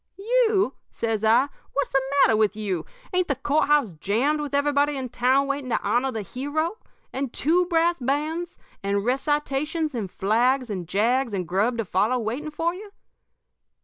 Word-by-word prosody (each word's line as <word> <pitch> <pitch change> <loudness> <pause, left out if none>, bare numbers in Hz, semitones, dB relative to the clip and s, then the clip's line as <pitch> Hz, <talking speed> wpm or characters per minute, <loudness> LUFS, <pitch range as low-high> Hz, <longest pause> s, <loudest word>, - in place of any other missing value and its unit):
"'You?' 435 - +2 0.2
says 225 -2 -2
I. 230 +5 +4 0.3
'What's 285 - -1
the 270 - +3 0.2
matter 220 - +3
with 215 -1 +2
you? 195 -6 -3 0.3
Ain't 365 0 +2
the 280 - 0
court 285 +4 +1
house 290 -10 +3
jammed 235 - 0
with 285 -1 -3
everybody 285 0 +2
in 260 -2 -4
town 255 +3 +2
waiting 275 -1 -3
to - - +1
honor 255 +3 +1
the 220 -3 -4
hero? 305 - -3 0.3
And 270 -2 -3
two 345 +7 +2
brass 340 -1 +2
bands, 305 +6 -2 0.2
and 200 +1 -1
recitations 295 +3 0
and 215 -6 -3
flags 240 +6 +1
and 180 -4 -4
jags 230 +5 +1
and 180 -3 -3
grub 205 +7 +1
to 230 - -1
follow 210 +7 +1
waiting 245 +7 -3
for 330 +3 -1
you?' 405 +2 -10
270 Hz, 170 wpm, -24 LUFS, 220-300 Hz, 0.3 s, I